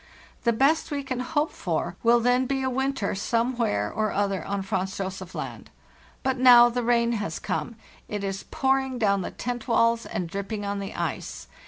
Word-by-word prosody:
The 235 - +5
best 275 +8 +2
we 285 -2 -3
can 255 -2 -3
hope 295 +4 0
for 170 0 -2
will 235 +1 +5
then 245 +2 +2
be 270 0 -1
a 260 - 0
winter 265 -5 -1
some 230 +5 0
where 105 - 0
or 215 -1 0
other 195 -4 0
on 200 -1 -3
Franz 190 -1 -2
Josef 190 -1 -5
Land. - - -6 0.5
But 265 -1 0
now 240 -1 +8
the 245 +1 -2
rain 235 0 +2
has 205 -8 -2
come. 235 - -3 0.3
It 205 -1 -4
is 195 0 -3
pouring 265 -1 +1
down 200 -4 +2
the - - -4
tent 245 0 -5
walls 230 -1 +2
and 180 - -3
dripping 200 +4 -4
on 200 0 -2
the 195 - -6
ice. - - -4
230 Hz, 190 wpm, -26 LUFS, 195-255 Hz, 0.5 s, now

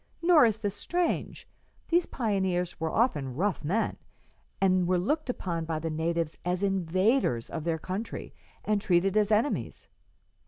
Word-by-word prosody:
Nor 335 -6 +7
is 220 -1 0
this 205 -3 -2
strange. 350 +11 -2 0.4
These 345 +1 +3
pioneers 190 -7 -1
were 160 -1 -1
often 145 - 0
rough 190 +4 -1
men, 195 +10 0 0.6
and 185 -2 +3
were 180 0 +2
looked 290 - -1
upon 170 -8 -2
by 160 -1 -2
the 160 +1 -3
natives 165 0 -2
as 180 +2 -1
invaders 185 - +1
of 160 -1 -4
their 165 -1 0
country 190 +7 -5 0.3
and 210 -1 +1
treated 195 -1 +2
as 210 0 +3
enemies. 220 +7 0
190 Hz, 150 wpm, -28 LUFS, 170-220 Hz, 0.6 s, Nor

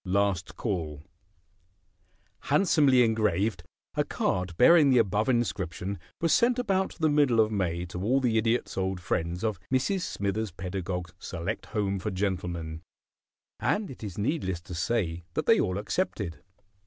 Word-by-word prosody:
P. 95 - -9
LAST 95 -2 0
CALL 80 - -3 1.4
Handsomely 145 -9 +4
engraved, 110 -3 +1 0.3
a - - +1
card 90 -2 -2
bearing 155 +2 +7
the 130 - +5
above 110 +1 +2
inscription 100 -6 -1 0.2
was 165 -1 +2
sent 240 +1 +4
about 195 -6 0
the 160 - +1
middle 145 -6 +3
of 110 0 +4
May 90 -4 -1
to 90 0 -6
all 125 +7 +2
the 125 -4 +1
Idiot's 115 -2 0
old 95 -1 -1
friends 90 0 -2
of 110 -5 -1
Mrs. 140 +9 +1
Smithers 105 - -2
Pedagog's 90 -1 -4
select - - -4
home 100 -3 -1
for 105 - -3
gentlemen, 90 -5 -3 0.8
and 205 -5 0
it 125 - -11
is 100 -4 -6
needless 105 - -1
to 90 - -9
say 85 -1 -1
that - - -1
they - - +5
all 90 +1 0
accepted. 105 - -2
100 Hz, 150 wpm, -28 LUFS, 90-125 Hz, 1.4 s, bearing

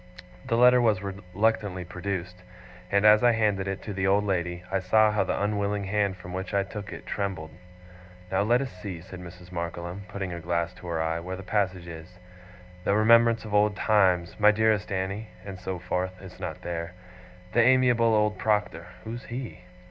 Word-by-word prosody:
The 115 - +1
letter 125 +1 +6
was 105 -5 +2
reluctantly 100 0 -1
produced; 90 0 -5 0.5
and 100 +1 +3
as 105 +2 +7
I 120 -1 +6
handed 105 -3 +1
it 95 0 -4
to 105 - -5
the 95 0 0
old 100 +2 +3
lady, 90 -3 -2
I 95 - +1
saw 105 +3 +4
how 105 - +1
the - - -2
unwilling 100 0 -1
hand 100 -1 0
from 90 0 -9
which 95 +2 -4
I 100 - +3
took 100 +1 -8
it, - - -9
trembled. 95 -6 -3 0.8
'Now 95 - +2
let 120 +5 +3
us 135 -3 -4
see,' 90 -2 -7
said 95 +1 -10
Mrs. 90 0 -12
Markleham, 85 +2 -5
putting 95 -2 -5
her 85 - -5
glass 85 +1 -1
to 90 - -12
her 85 -1 -2
eye, 80 +1 -1
'where 90 +2 -5
the 95 - -9
passage 95 -3 -1
is. 85 +2 -10 0.7
"The 100 - +2
remembrance 115 +1 +5
of 105 - -7
old 105 0 +3
times, 95 -4 +2
my 105 0 +7
dearest 110 -1 +2
Annie" 95 +3 -2 0.2
and 95 -2 -7
so 95 0 -4
forth 90 +1 -3
it's 95 -1 -12
not - - -6
there. 85 0 -4 0.6
"The 120 - +5
amiable 120 -2 +4
old 105 -2 +1
Proctor" 105 -6 0 0.2
who's 115 +2 -7
he? 120 -4 -6
100 Hz, 190 wpm, -27 LUFS, 90-105 Hz, 0.8 s, as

